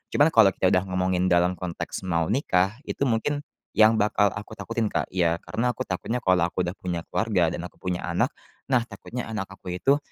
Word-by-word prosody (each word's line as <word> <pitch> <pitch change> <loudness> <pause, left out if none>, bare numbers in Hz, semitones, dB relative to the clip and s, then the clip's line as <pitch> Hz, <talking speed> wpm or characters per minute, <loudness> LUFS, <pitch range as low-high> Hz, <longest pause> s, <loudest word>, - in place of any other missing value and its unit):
Cuman 145 - +6
kalau 110 -4 +7
kita 95 - +2
udah 90 - +3
ngomongin 90 0 +1
dalam 90 0 +3
konteks 90 -2 -4
mau 85 -2 +1
nikah, 100 -5 +1
itu - - -1
mungkin 125 +6 0 0.4
yang 110 +1 +7
bakal 105 -1 +3
aku 105 +2 -8
takutin, 115 -1 -2
Kak. - - -1
Ya, 85 -2 +2
karena 120 +3 0
aku - - -3
takutnya 115 +6 -2
kalau 90 -2 +3
aku 90 - -1
udah 90 - -4
punya 90 -2 -2
keluarga 100 -7 +2
dan 85 - -4
aku - - -26
punya 90 -2 -2
anak, - - +1 0.4
nah, 130 -2 +4
takutnya 125 +1 -6
anak 105 -3 -3
aku 95 -2 -8
itu 140 +9 +3
95 Hz, 200 wpm, -25 LUFS, 90-115 Hz, 0.4 s, kalau